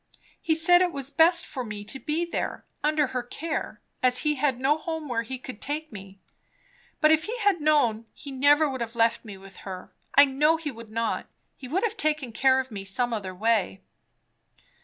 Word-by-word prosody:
"He 320 - +1
said 350 +3 +5
it 360 -1 +2
was 275 -3 -4
best 335 +1 +4
for 260 - -5
me 210 -2 -7
to 270 +6 -6
be 315 +4 -1
there, 340 - -4 0.2
under 300 0 +2
her 250 - 0
care, 315 +6 -5 0.2
as 250 0 +3
he 300 - +3
had 270 -3 0
no 285 +4 +2
home 320 -1 -5
where 235 -3 -1
he 260 +3 -6
could 255 -3 -10
take 305 +2 -4
me. 195 -2 -11 0.8
But 305 - +5
if 315 0 +3
he 465 +3 -4
had 405 -7 +2
known, 240 -8 +2
he 285 - -9
never 290 +3 +4
would 260 -3 -4
have 235 0 -4
left 230 0 +2
me 205 -4 -9
with 195 0 -15
her. 185 -2 -9 0.2
I 285 - +9
know 300 +4 +2
he 315 -2 -5
would 230 -2 -12
not. 230 +1 -2 0.3
He 260 - -10
would 350 - -1
have 445 -1 -1
taken 300 -5 +1
care 260 +4 +3
of 260 -1 -4
me 200 -2 -6
some 240 +5 0
other 190 -4 -4
way." 210 - +1
265 Hz, 205 wpm, -26 LUFS, 230-310 Hz, 0.8 s, I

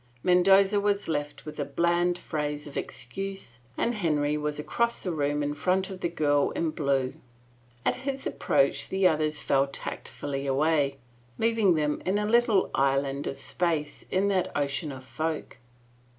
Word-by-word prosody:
Mendoza 195 +3 +5
was 200 0 0
left 145 -2 -3
with 150 - -8
a - - +1
bland 175 +5 +1
phrase 150 -3 -3
of 145 - -10
excuse 130 0 -5 0.2
and 235 - +1
King - - -6
Henry 150 -3 +1
was 150 0 -2
across 235 +10 -1
the 185 - -1
room 145 -2 0
in 145 0 -1
front 185 +6 0
of 185 -1 -8
the 170 - 0
girl 145 -4 +2
in 165 -2 0
blue. 140 -4 0 0.7
At - - +2
his 270 +1 -4
approach - - +1
the 190 0 +3
others 155 -2 0
fell 135 0 +2
tactfully 140 0 -5
away, 140 0 +2 0.4
leaving 225 -5 +3
them 150 -1 0
in 190 +2 +1
a 210 - 0
little 225 -2 +3
island 135 +1 +1
of 135 - -4
space 150 +2 -2
in 190 +2 +2
that 190 -2 +1
ocean 145 +2 -1
of 130 -1 -9
folk. 155 -2 -4
155 Hz, 165 wpm, -27 LUFS, 145-190 Hz, 0.7 s, Mendoza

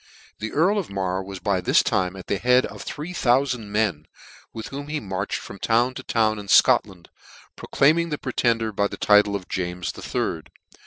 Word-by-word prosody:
The 110 +1 -4
earl 190 +7 +2
of 190 - -5
Mar 95 -1 -2
was 95 0 -8
by 95 -1 -1
this - - +3
time 90 0 0
at 95 - -9
the 100 - -2
head 125 +1 +4
of - - -9
three 155 +5 -6
thoufard 130 -3 +2
men, 105 -7 -2 0.4
with 110 - -7
whom 140 +1 -7
he 150 0 -2
marched 95 -2 -3
from 100 - -10
town 120 +3 +2
to - - -7
town 110 -2 0
in 100 - -9
Scotland, 95 -3 +3 0.5
proclaiming 165 +4 +2
the 150 - -2
Pretender 115 -4 0
by 100 0 0
the - - -8
title 105 -1 +4
of 95 -3 -5
James 90 -1 -3
the - - -11
Third. - - -3
110 Hz, 195 wpm, -23 LUFS, 95-130 Hz, 0.5 s, head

